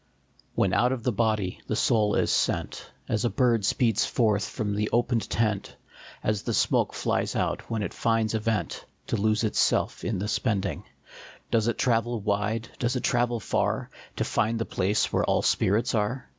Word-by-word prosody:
HEN 95 - +2
out 125 +5 +3
of 130 -3 -3
the 125 - +1
body 105 -4 0
the 110 - -1
soul 105 -3 +2
is - - +2
sent, - - -1 0.2
As 110 -1 0
a 120 - +2
bird 120 -6 +2
speeds 115 +1 +2
forth 105 -4 +1
from 105 -2 -3
the 105 +1 -1
opened 120 -3 +1
tent, 105 -3 -1 0.5
As 105 -1 0
the - - -2
smoke - - +1
flies - - -1
out - - -2
when 110 -2 -1
it - - -4
finds 115 -1 +1
a 110 - +1
vent, 110 0 -2 0.2
To - - -1
lose 110 +1 +1
itself 110 - +1
in 110 - -1
the 100 +3 -3
spending, 100 - -1 0.7
Does 115 -1 +2
it 120 - 0
travel 120 -1 +1
wide, 105 +2 -1
does 120 +1 0
it 125 - -2
travel 120 -2 +1
far, 100 - -1 0.2
To - - -1
find 115 +2 0
the 115 - -2
place 100 +3 0
where - - +2
all - - +1
spirits 110 +5 +2
are? 115 +4 -1
110 Hz, 185 wpm, -26 LUFS, 105-115 Hz, 0.7 s, out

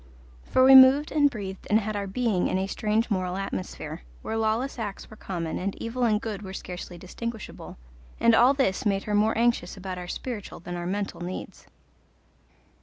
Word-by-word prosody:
For 255 - +3
we 265 +1 +8
moved 265 +3 +8
and 290 -2 +4
breathed 195 -6 -7
and 215 - +5
had 215 0 -3
our 200 -1 -2
being 205 -2 0
in - - 0
a 190 - 0
strange 215 +3 -1
moral 185 -2 -1
atmosphere, 95 - -5 0.2
where 220 - -3
lawless 225 +4 0
acts 205 -2 -6
were - - -10
common 170 -6 -4
and 195 +2 -3
evil 245 +2 -1
and 215 -2 +2
good 210 -3 -5
were 190 -2 -8
scarcely 180 -1 -7
distinguishable, 220 +5 -7 0.4
and 230 - +5
all 245 +5 +6
this 265 -4 +1
made 200 -3 +1
her 210 - -3
more 215 +2 +2
anxious 230 -6 +1
about 185 -1 -5
our 180 - -7
spiritual 220 +2 -6
than 175 +1 -6
our 175 0 -4
mental 200 -1 -3
needs. 180 +1 -7
210 Hz, 185 wpm, -26 LUFS, 190-235 Hz, 0.4 s, we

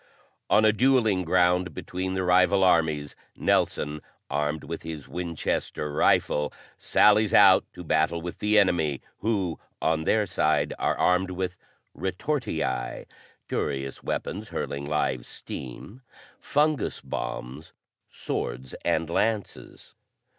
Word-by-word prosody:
On 110 - +5
a 110 - +5
dueling 110 -6 +3
ground 90 -1 +2
between 95 +1 -4
the 95 - -1
rival 90 +2 +4
armies 80 -5 +2 0.2
Nelson, 75 +1 0 0.3
armed 75 +1 -1
with 85 +2 -6
his 80 -3 -7
Winchester 85 -3 -3
rifle, 75 0 +2 0.2
sallies 105 +1 +4
out 95 -3 +7
to 90 - -9
battle 80 +1 +1
with 85 +1 -7
the 105 +1 +2
enemy, 80 -9 +2 0.2
who, 100 -7 -1 0.2
on 80 0 0
their 105 +4 +3
side, 90 - +1
are - - 0
armed 90 +1 +2
with 90 0 -3 0.4
retortii 80 - -2 0.4
curious 70 -1 -3
weapons 105 +3 -4
hurling 70 0 -4
live 65 -4 0
steam 100 - -8 0.4
fungus 150 0 0
bombs, 65 +4 -6 0.4
swords 65 +2 -4
and 85 - +1
lances. 105 +5 -2
90 Hz, 115 wpm, -26 LUFS, 75-100 Hz, 0.4 s, out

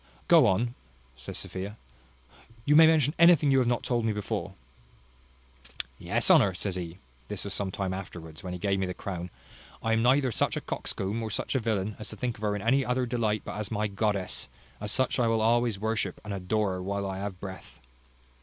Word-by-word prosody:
"Go 165 -8 +7
on," 115 +5 +1 0.4
says 65 0 -6
Sophia; 100 +3 -5 0.9
"you 150 - +4
may 160 +1 +9
mention 150 -3 +4
anything 170 -4 +6
you 135 - +5
have 125 - +2
not 120 -1 +1
told 120 -2 0
me 110 - +1
before." 105 -1 -3 1.4
"Yes, - - +2
Honour, 95 -3 +5
says 95 +1 -2
he 85 -1 -5 0.3
(this - - -3
was 100 - -4
some 100 -2 -1
time 95 0 -2
afterwards, 85 -4 -8
when 90 - -5
he - - -4
gave 95 +1 0
me 95 - 0
the 90 - -4
crown), 90 -2 -5 0.5
I 115 - +2
am 115 - +2
neither 130 +2 +4
such - - 0
a - - -2
coxcomb, 100 +4 -3
or 110 - -3
such 105 - -2
a 130 - +2
villain, 105 -3 -1
as 105 - -5
to - - -6
think 125 -3 -2
of - - -15
her 105 -1 0
in 100 - -4
any 135 +4 +3
other 125 0 0
delight 115 -3 0
but - - -5
as 105 -1 -4
my 105 -1 0
goddess; 100 -1 -1 0.3
as 105 0 -3
such 130 +2 +1
I 120 - +3
will 115 0 +2
always 115 -1 +2
worship 110 +2 -2
and 105 - -4
adore 100 +2 0
her 90 0 -4
while 100 +1 -2
I 95 0 -4
have 100 -2 -5
breath. 95 -1 -9
105 Hz, 210 wpm, -28 LUFS, 95-120 Hz, 1.4 s, may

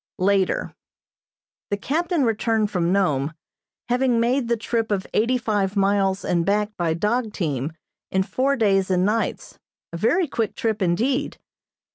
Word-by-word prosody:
Later: 195 0 +1 1.0
The 205 - 0
captain 325 - 0
returned 225 -2 +1
from 175 -2 0
Nome, 155 -6 +1 0.5
having 245 -1 +2
made 245 +2 +1
the 235 0 +1
trip 225 0 -1
of 195 -2 0
eighty 240 +4 +2
five 205 -4 -1
miles 195 -1 +1
and 170 -1 +1
back 210 +2 0
by 165 -2 0
dog 215 +5 -1
team 150 -4 -2 0.4
in 190 0 +1
four 270 +7 0
days 195 -6 +2
and 185 0 +2
nights, 220 +3 -2 0.3
a - - -3
very 330 - +2
quick 225 -5 -2
trip 225 -5 -1
indeed. 245 +11 0
210 Hz, 145 wpm, -23 LUFS, 190-235 Hz, 1.0 s, having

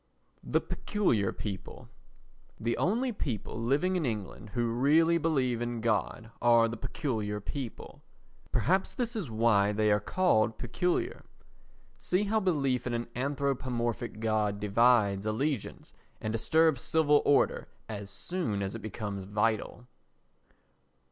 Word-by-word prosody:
The - - +1
Peculiar 120 - 0
People 100 -3 -7 0.7
The 115 +1 0
only 240 +7 +1
people 115 - -3
in 180 +5 +2
England 105 -4 -4
who 120 -1 +1
really 160 +7 +4
believe 130 -7 0
in 120 -1 -2
God 115 +1 -1
are 115 -1 +5
the 115 - -4
Peculiar 110 -5 -3
People. 120 +3 -7 0.5
Perhaps 190 +2 +1
that 240 -2 -2
is 195 - -3
why 110 -2 +3
they 105 0 +2
are 105 - +4
called 110 - +2
peculiar. 180 - -1 0.7
See 185 +3 0
how 215 +2 +1
belief 140 - 0
in 120 - -1
an 120 0 -3
anthropomorphic 125 -4 -2
God 110 -2 0
divides 105 -1 +3
allegiance 130 +3 -2 0.3
and 110 - -3
disturbs 155 +4 +3
civil 150 -2 +3
order 145 - +2 0.2
as 100 -2 -6
soon 105 - -2
as 95 - -3
it 115 - -6
becomes 100 -2 -5
vital. 110 +4 -1
120 Hz, 125 wpm, -30 LUFS, 110-150 Hz, 0.7 s, are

